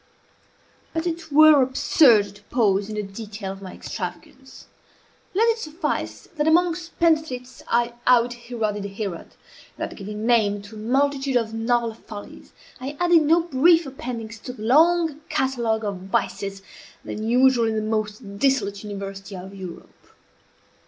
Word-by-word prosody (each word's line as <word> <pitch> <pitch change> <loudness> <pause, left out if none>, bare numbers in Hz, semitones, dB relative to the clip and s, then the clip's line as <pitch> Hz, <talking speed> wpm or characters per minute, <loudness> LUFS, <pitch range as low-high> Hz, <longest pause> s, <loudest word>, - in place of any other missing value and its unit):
But 325 +1 -1
it 335 -2 -4
were 305 -1 +7
absurd 250 -5 +4
to 205 - -18
pause 205 -4 +1
in 215 - -5
the 210 - -2
detail 205 0 -7
of 195 0 -10
my 190 -2 -9
extravagance. - - -8 0.7
Let 450 +4 +4
it 455 0 +1
suffice, 315 -1 -4
that 300 +1 +1
among 340 +2 +4
spendthrifts 315 -7 -1
I 240 0 +1
out 245 -1 +5
Heroded 225 -4 -3
Herod, 195 -6 -5 0.4
and - - -4
that, - - -10
giving 210 +2 -6
name 210 -4 +2
to 210 +2 -12
a - - -8
multitude 270 +3 0
of 225 -2 -2
novel 230 0 0
follies, 210 -2 -11 0.3
I 275 +3 -6
added 345 -2 +5
no 325 +3 +4
brief 330 +2 +4
appendix 235 -4 -6
to 250 - -7
the 215 - -10
long 320 +4 +3
catalogue 235 -4 0
of 200 -2 -2
vices 195 0 -3 0.4
then 215 - -5
usual 245 +1 +4
in 220 - -1
the 215 - 0
most 215 -1 -3
dissolute 205 -7 +1
university 195 -1 -7
of 190 +1 -9
Europe. 185 -3 -11
235 Hz, 150 wpm, -23 LUFS, 205-285 Hz, 0.7 s, were